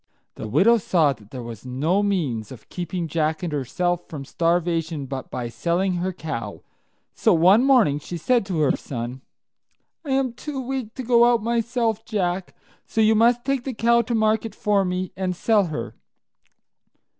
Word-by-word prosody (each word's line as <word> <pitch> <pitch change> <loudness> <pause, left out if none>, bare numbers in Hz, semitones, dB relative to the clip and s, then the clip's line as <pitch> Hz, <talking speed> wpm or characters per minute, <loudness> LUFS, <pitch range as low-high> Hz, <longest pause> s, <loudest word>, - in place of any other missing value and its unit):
The - - -7
widow 230 - +4
saw 160 -7 +2
that 105 -4 -19
there 125 -1 -7
was 115 -3 -8
no 145 +10 0
means 150 - -1
of 125 -4 -12
keeping 175 -1 -4
Jack 155 +2 -1
and 170 -4 -3
herself 175 +6 -1
from 145 -3 -7
starvation 165 -2 0
but 135 0 -6
by 120 -1 -4
selling 175 +8 -1
her 185 +2 -1
cow; 160 -8 -6 0.5
so - - +3
one 185 +8 +5
morning 240 - +4
she 170 +4 -6
said 240 +8 +2
to 175 -5 -1
her 145 - +3
son, 125 0 -6 0.8
"I 295 - -8
am 265 -3 +1
too 280 +3 -6
weak 255 -3 -4
to 260 - -5
go 240 0 +5
myself, 230 0 -1
Jack, 185 -4 -2 0.3
so - - -3
you 220 0 +5
must 235 +2 +3
take 275 -2 0
the 260 -3 -5
cow 235 +1 +3
to 235 +1 -2
market 220 -1 +1
for 205 -2 +2
me, 180 0 -2
and 185 -1 -2
sell 210 +2 +2
her." 150 -9 -5
180 Hz, 170 wpm, -23 LUFS, 155-225 Hz, 0.8 s, one